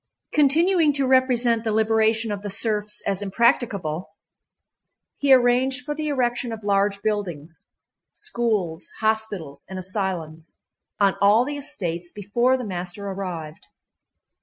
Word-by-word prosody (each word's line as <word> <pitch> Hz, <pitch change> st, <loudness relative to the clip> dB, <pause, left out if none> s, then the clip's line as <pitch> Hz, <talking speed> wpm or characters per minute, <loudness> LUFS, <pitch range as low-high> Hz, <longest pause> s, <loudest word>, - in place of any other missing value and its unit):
Continuing 310 Hz, +2 st, +4 dB
to 275 Hz, -1 st, 0 dB
represent 250 Hz, -3 st, +3 dB
the 220 Hz, -, -1 dB
liberation 220 Hz, +1 st, +2 dB
of 205 Hz, -1 st, -4 dB
the 205 Hz, -, -5 dB
serfs 210 Hz, +1 st, -2 dB
as 200 Hz, 0 st, -1 dB
impracticable, 200 Hz, -, 0 dB, 1.1 s
he 285 Hz, -1 st, +2 dB
arranged 255 Hz, 0 st, +4 dB
for 295 Hz, -, -2 dB
the 305 Hz, 0 st, -4 dB
erection 245 Hz, -3 st, 0 dB
of 220 Hz, -1 st, -7 dB
large 200 Hz, 0 st, +1 dB
buildings—schools, 200 Hz, -, -3 dB
hospitals, 210 Hz, -10 st, -1 dB
and 190 Hz, -, -6 dB
asylums—on 185 Hz, 0 st, -3 dB
all 210 Hz, +4 st, +5 dB
the 290 Hz, +1 st, -4 dB
estates 175 Hz, -, -4 dB
before 235 Hz, +7 st, +1 dB
the 250 Hz, -, -5 dB
master 180 Hz, +1 st, -5 dB
arrived. 175 Hz, -5 st, -6 dB
215 Hz, 115 wpm, -23 LUFS, 190-250 Hz, 1.1 s, all